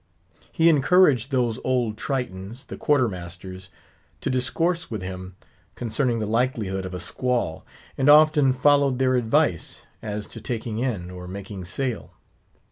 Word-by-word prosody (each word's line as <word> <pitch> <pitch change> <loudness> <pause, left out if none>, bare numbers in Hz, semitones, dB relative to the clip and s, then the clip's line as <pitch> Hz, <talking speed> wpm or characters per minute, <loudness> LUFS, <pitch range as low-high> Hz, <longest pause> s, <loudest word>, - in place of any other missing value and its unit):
He 165 - +3
encouraged 145 -4 +4
those 125 -3 0
old 125 -4 0
Tritons, 115 -2 -4
the - - -8
Quarter 145 -4 +2
masters, 95 0 -8 0.5
to - - -1
discourse 165 +7 0
with 110 -5 -5
him 95 0 -7 0.4
concerning 120 +1 0
the 110 - -2
likelihood 110 -5 -1
of 90 - -7
a - - -4
squall; 120 -1 -2 0.4
and 135 +2 +3
often 150 -2 +6
followed 140 0 +3
their 130 0 +2
advice 125 - 0 0.2
as 105 -1 -4
to 115 - -10
taking 110 -1 -4
in, 105 -9 -2
or 90 0 -8
making 95 0 -7
sail. 125 +5 -4
120 Hz, 140 wpm, -24 LUFS, 95-135 Hz, 0.5 s, often